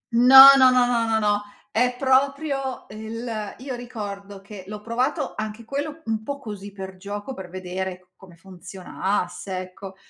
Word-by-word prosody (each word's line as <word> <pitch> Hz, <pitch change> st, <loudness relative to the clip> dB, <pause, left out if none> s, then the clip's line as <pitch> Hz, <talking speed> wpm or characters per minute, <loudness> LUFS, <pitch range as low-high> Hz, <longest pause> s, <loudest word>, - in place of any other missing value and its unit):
No, 265 Hz, +3 st, +10 dB
no, 260 Hz, -1 st, +7 dB
no, 250 Hz, -1 st, +4 dB
no, 235 Hz, -2 st, 0 dB
no, 220 Hz, 0 st, +1 dB
no, 205 Hz, -1 st, +1 dB, 0.3 s
è 245 Hz, +2 st, +1 dB
proprio 275 Hz, +1 st, 0 dB
el 220 Hz, 0 st, -6 dB
io 260 Hz, +1 st, -7 dB
ricordo 205 Hz, -5 st, -8 dB
che 200 Hz, -1 st, -11 dB
l'ho 210 Hz, 0 st, -7 dB
provato, 250 Hz, +7 st, -2 dB
anche 215 Hz, +1 st, -6 dB
quello, 290 Hz, +5 st, -5 dB
un 220 Hz, -1 st, -2 dB
po' 280 Hz, +5 st, -5 dB
così 205 Hz, -6 st, -9 dB
per 190 Hz, -1 st, -9 dB
gioco, 205 Hz, +6 st, -7 dB
per 190 Hz, -6 st, -9 dB
vedere 185 Hz, 0 st, -6 dB
come 185 Hz, -3 st, -17 dB
funzionasse, 185 Hz, +1 st, -5 dB
ecco. 185 Hz, +1 st, -9 dB
215 Hz, 155 wpm, -23 LUFS, 195-255 Hz, 0.3 s, No